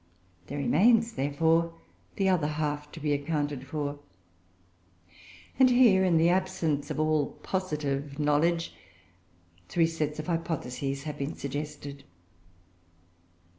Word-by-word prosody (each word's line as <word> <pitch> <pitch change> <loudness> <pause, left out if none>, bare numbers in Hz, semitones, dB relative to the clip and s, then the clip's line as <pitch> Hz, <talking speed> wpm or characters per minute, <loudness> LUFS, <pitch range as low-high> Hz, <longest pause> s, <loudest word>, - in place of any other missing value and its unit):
There 145 - -5
remains, 225 - +3
therefore, 165 +3 +1 0.4
the 195 - +1
other 180 -6 +2
half 150 -1 -3
to 165 - -8
be 150 -1 0
accounted 145 -2 -2
for; 145 -1 -3 1.6
and 260 -1 +7
here, 240 -7 +5
in 180 -3 +3
the 165 +1 +4
absence 175 -6 0
of - - -3
all 155 -2 +1
positive 145 -6 -2
knowledge, 155 +3 +1 1.0
three 170 -1 +3
sets 155 -2 -2
of 155 - -4
hypotheses 140 -5 -3
have 150 -1 -6
been 140 +2 -3
suggested. 145 0 -6
150 Hz, 115 wpm, -28 LUFS, 145-170 Hz, 1.6 s, and